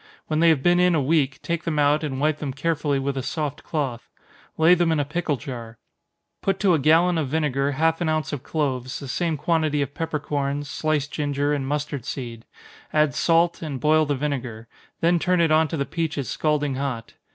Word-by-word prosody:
When 155 Hz, 0 st, -1 dB
they 170 Hz, 0 st, +6 dB
have 150 Hz, -5 st, +2 dB
been 175 Hz, 0 st, +4 dB
in 180 Hz, -1 st, +4 dB
a -, -, +3 dB
week, 140 Hz, -1 st, +1 dB
take 170 Hz, -1 st, -2 dB
them 160 Hz, -2 st, -2 dB
out, 150 Hz, +1 st, +3 dB
and 135 Hz, -3 st, -3 dB
wipe 150 Hz, +1 st, +1 dB
them 140 Hz, -3 st, -4 dB
carefully 145 Hz, 0 st, 0 dB
with 135 Hz, +1 st, -2 dB
a 135 Hz, -, -2 dB
soft 145 Hz, +2 st, -4 dB
cloth. 135 Hz, -7 st, -3 dB, 0.5 s
Lay 160 Hz, +2 st, +6 dB
them 175 Hz, -2 st, +2 dB
in 160 Hz, -, +1 dB
a 145 Hz, -, 0 dB
pickle 155 Hz, -1 st, -1 dB
jar. 120 Hz, -5 st, -8 dB, 0.6 s
Put 195 Hz, 0 st, 0 dB
to 195 Hz, -4 st, +4 dB
a 160 Hz, -, +3 dB
gallon 165 Hz, +4 st, +4 dB
of 150 Hz, -, -1 dB
vinegar 145 Hz, -2 st, 0 dB
half 160 Hz, +4 st, +1 dB
an 165 Hz, -, +1 dB
ounce 155 Hz, -1 st, -1 dB
of 140 Hz, -, -3 dB
cloves, 130 Hz, -5 st, -2 dB
the 140 Hz, -, -8 dB
same 165 Hz, +4 st, -1 dB
quantity 155 Hz, -1 st, +1 dB
of 140 Hz, 0 st, -7 dB
peppercorns, 145 Hz, -3 st, -2 dB
sliced 150 Hz, -1 st, -1 dB
ginger 145 Hz, -1 st, -1 dB
and 135 Hz, -2 st, -2 dB
mustard 145 Hz, -2 st, -3 dB
seed 120 Hz, -4 st, -6 dB, 0.5 s
add 150 Hz, -3 st, +2 dB
salt, 165 Hz, +2 st, +2 dB
and 145 Hz, -5 st, -4 dB
boil 155 Hz, +1 st, +3 dB
the 145 Hz, -, +1 dB
vinegar 130 Hz, -5 st, -4 dB, 0.3 s
then 170 Hz, +1 st, +3 dB
turn 180 Hz, +1 st, +1 dB
it 165 Hz, -2 st, +3 dB
on 160 Hz, 0 st, +4 dB
to 160 Hz, -, -4 dB
the 140 Hz, -, -1 dB
peaches 160 Hz, -6 st, -3 dB
scalding 150 Hz, -3 st, 0 dB
hot. 130 Hz, -5 st, -4 dB
150 Hz, 210 wpm, -24 LUFS, 140-160 Hz, 0.6 s, they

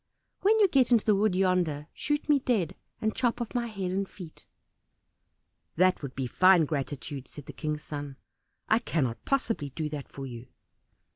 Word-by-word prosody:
"When 435 Hz, +3 st, +4 dB
you 410 Hz, -, +6 dB
get 270 Hz, -7 st, +3 dB
into 230 Hz, -3 st, +4 dB
the 215 Hz, -, +5 dB
wood 200 Hz, -1 st, +2 dB
yonder, 180 Hz, -6 st, +1 dB
shoot 295 Hz, 0 st, -2 dB
me 295 Hz, -2 st, +5 dB
dead, 220 Hz, -, 0 dB, 0.2 s
and 220 Hz, 0 st, -1 dB
chop 240 Hz, -2 st, 0 dB
off 235 Hz, -2 st, -4 dB
my 240 Hz, -1 st, 0 dB
head 195 Hz, -5 st, -3 dB
and 195 Hz, +1 st, -1 dB
feet." 175 Hz, -5 st, -12 dB, 1.3 s
"That 185 Hz, +2 st, +3 dB
would 140 Hz, -3 st, -6 dB
be 130 Hz, -, -2 dB
fine 180 Hz, +6 st, +5 dB
gratitude," 140 Hz, -2 st, -4 dB
said 145 Hz, -, -10 dB
the -, -, -9 dB
King's 150 Hz, -1 st, -3 dB
son. 145 Hz, -2 st, -6 dB, 0.5 s
"I 220 Hz, -, +4 dB
cannot 130 Hz, -, -1 dB
possibly 230 Hz, -, 0 dB
do 150 Hz, +3 st, -4 dB
that 145 Hz, -2 st, -6 dB
for 135 Hz, -, -7 dB
you." 120 Hz, -1 st, -8 dB
180 Hz, 180 wpm, -28 LUFS, 145-225 Hz, 1.3 s, you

